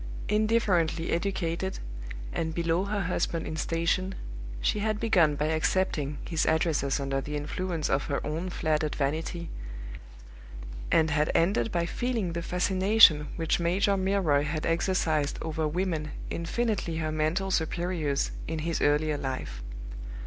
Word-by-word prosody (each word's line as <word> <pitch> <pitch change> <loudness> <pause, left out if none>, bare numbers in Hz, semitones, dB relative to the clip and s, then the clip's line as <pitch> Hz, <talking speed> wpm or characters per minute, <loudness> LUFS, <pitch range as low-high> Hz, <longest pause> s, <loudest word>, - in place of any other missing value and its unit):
Indifferently 210 -7 +2
educated, 180 0 -1 0.6
and 160 0 -2
below 170 +2 +1
her 205 0 -1
husband 170 -2 -1
in 155 - -4
station, 170 +4 0 0.4
she 135 - +1
had 215 0 0
begun 180 -10 +4
by 150 - 0
accepting 155 -2 0
his 165 -3 0
addresses 155 -4 +2
under 135 0 -1
the 150 +2 -5
influence 160 +2 -2
of 135 0 +1
her 140 - -1
own 160 +5 -2
flattered 155 -3 0
vanity, 160 +4 -2 1.4
and 160 -1 +4
had 150 +1 +2
ended 195 +6 +2
by 170 -1 +1
feeling 225 -3 -1
the 170 - -2
fascination 185 -2 +5
which 165 0 +1
Major 190 +4 +2
Milroy 190 -7 +2
had 155 +1 -2
exercised 165 -3 +1
over 160 -1 -1
women 165 -2 -1 0.2
infinitely 175 -1 -1
her 155 -1 -1
mental 155 +5 0
superiors 160 -4 0 0.2
in 160 - -2
his 165 +2 -2
earlier 150 0 +2
life. 130 - -4
165 Hz, 135 wpm, -28 LUFS, 155-185 Hz, 1.4 s, fascination